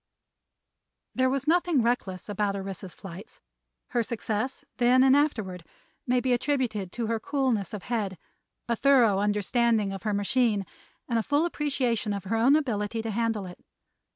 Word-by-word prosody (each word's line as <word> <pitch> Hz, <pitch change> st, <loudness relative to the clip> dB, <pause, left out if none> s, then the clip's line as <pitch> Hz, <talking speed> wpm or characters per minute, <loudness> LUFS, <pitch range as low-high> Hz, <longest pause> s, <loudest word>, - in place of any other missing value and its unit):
There 260 Hz, 0 st, +2 dB
was 270 Hz, 0 st, -1 dB
nothing 340 Hz, -5 st, +3 dB
reckless 225 Hz, -6 st, -1 dB
about 205 Hz, -1 st, -1 dB
Orissa's 195 Hz, -2 st, -6 dB
flights; 195 Hz, +2 st, -11 dB, 0.5 s
her 240 Hz, -, +1 dB
success, 230 Hz, +4 st, -3 dB
then 250 Hz, +1 st, +5 dB
and 265 Hz, 0 st, +6 dB
afterward, 220 Hz, -, 0 dB, 0.4 s
may 250 Hz, 0 st, +3 dB
be 255 Hz, 0 st, +1 dB
attributed 240 Hz, -7 st, -1 dB
to 235 Hz, -, -2 dB
her 225 Hz, 0 st, -1 dB
coolness 250 Hz, -8 st, -1 dB
of 210 Hz, -3 st, -6 dB
head, 210 Hz, -6 st, -2 dB, 0.5 s
a 235 Hz, -, +1 dB
thorough 240 Hz, -6 st, +4 dB
understanding 210 Hz, +1 st, +1 dB
of 195 Hz, -, -6 dB
her 215 Hz, -2 st, -1 dB
machine 205 Hz, 0 st, +1 dB, 0.4 s
and 235 Hz, -2 st, +1 dB
a -, -, +2 dB
full 290 Hz, +7 st, +1 dB
appreciation 255 Hz, -10 st, -1 dB
of 200 Hz, -2 st, -4 dB
her 205 Hz, +4 st, -2 dB
own 245 Hz, +6 st, +5 dB
ability 225 Hz, -6 st, -1 dB
to 225 Hz, -, -3 dB
handle 225 Hz, -2 st, -1 dB
it. 180 Hz, -1 st, -10 dB
230 Hz, 155 wpm, -27 LUFS, 205-255 Hz, 0.5 s, and